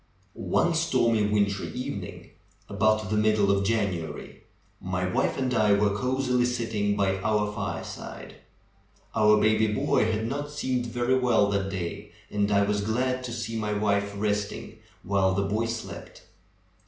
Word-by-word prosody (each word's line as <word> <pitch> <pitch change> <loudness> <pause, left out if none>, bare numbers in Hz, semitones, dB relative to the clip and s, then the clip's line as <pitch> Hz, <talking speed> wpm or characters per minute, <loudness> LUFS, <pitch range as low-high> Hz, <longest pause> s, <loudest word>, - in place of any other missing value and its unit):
One 170 - +1
stormy, 125 -10 +2
wintry 100 -1 0
evening 125 - -6 0.4
about 110 +1 +1
the 105 - +1
middle 105 -2 +3
of 100 0 +2
January, 100 -6 -2 0.4
my 90 -1 -2
wife 90 - 0
and 130 -1 -1
I 110 -3 +4
were 100 0 +2
cosily 125 +1 +1
sitting 115 -4 -1
by 95 -1 +1
our 105 0 0
fire 105 -1 -3
side. - - -9 0.8
Our 105 -1 +5
baby 110 +1 +3
boy 105 +1 +1
had 110 0 -1
not 145 +4 -3
seemed 130 -4 -2
very 120 +2 +1
well 120 -5 +3
that 100 -1 0
day 95 +2 -5 0.2
and 105 0 0
I 100 0 +4
was 105 0 0
glad 125 +4 -1
to 120 - -5
see 115 -1 -4
my 105 -1 -1
wife 100 -1 0
resting 105 0 -2 0.2
while 95 -1 +1
the 100 - +1
boy 105 +4 -1
slept. 115 -1 -7
105 Hz, 155 wpm, -27 LUFS, 100-120 Hz, 0.8 s, Our